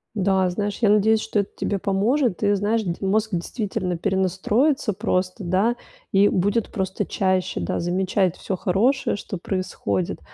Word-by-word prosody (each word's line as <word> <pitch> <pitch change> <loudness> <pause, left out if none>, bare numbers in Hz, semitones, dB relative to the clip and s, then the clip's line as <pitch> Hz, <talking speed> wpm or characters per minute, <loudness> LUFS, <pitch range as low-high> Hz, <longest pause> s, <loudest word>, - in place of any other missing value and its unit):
Да, 190 -2 +2
знаешь, 205 +2 -2
я 215 - +4
надеюсь, 215 +1 +4
что 220 -1 0
это 200 - -4
тебе 200 -2 -2
поможет, 210 +3 +1
и, 205 - +4
знаешь, 210 +3 +1
д 170 -2 -1
мозг 215 +3 +1
действительно 185 0 -2
перенастроится 205 - +1
просто, 185 -1 -1
да, 190 +7 +1 0.4
и 200 +1 +5
будет 205 +5 +1
просто 190 -1 -2
чаще, 185 -1 0
да, - - -2
замечать 185 +1 0
всё 190 - -4
хорошее, 220 +11 +1
что 195 -2 -6
происходит. 170 - -2
195 Hz, 150 wpm, -23 LUFS, 185-215 Hz, 0.4 s, и